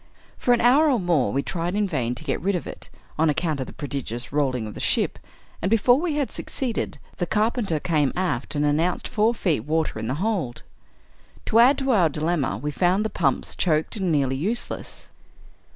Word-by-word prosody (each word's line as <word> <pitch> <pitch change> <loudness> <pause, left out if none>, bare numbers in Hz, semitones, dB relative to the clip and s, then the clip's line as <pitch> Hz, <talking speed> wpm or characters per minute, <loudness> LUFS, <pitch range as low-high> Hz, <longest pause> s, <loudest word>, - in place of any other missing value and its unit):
For 245 - 0
an 240 - +4
hour 275 +6 +5
or 255 -5 +2
more, 165 - +1
we 140 +1 0
tried 175 +1 -3
in 210 -1 +1
vain 125 -8 -1
to 140 - -8
get 140 -4 -2
rid 195 +2 +1
of 175 - -3
it, - - -9 0.3
on 160 0 +4
account 155 -1 0
of 130 - -3
the - - -8
prodigious 135 -5 -5
rolHng 130 -5 0
of 105 - -7
the - - -9
ship; - - 0 0.4
and, 185 - 0
before 235 +4 +4
we 330 -2 -1
had 290 -3 -1
succeeded, 250 -4 -3 0.2
the 175 - -1
car 215 +4 +2
penter 200 -12 -1
came 150 -4 +1
aft 185 -3 -2
and 145 0 +1
announced 160 +5 +1
four 225 +1 +1
feet 170 - +1
water 155 0 -1
in 110 - -4
the 130 - -1
hold. 180 - -2 0.8
To 225 - +3
add 260 +4 +6
to 270 -1 0
our 185 -8 +4
dilemma, 155 - -1
we 145 +6 -3
found 185 +7 +2
the 220 - -2
pumps 140 -7 0
choked 155 0 0
and 190 -5 -1
nearly 135 -3 +1
useless. 205 - -4
170 Hz, 205 wpm, -24 LUFS, 145-215 Hz, 0.8 s, add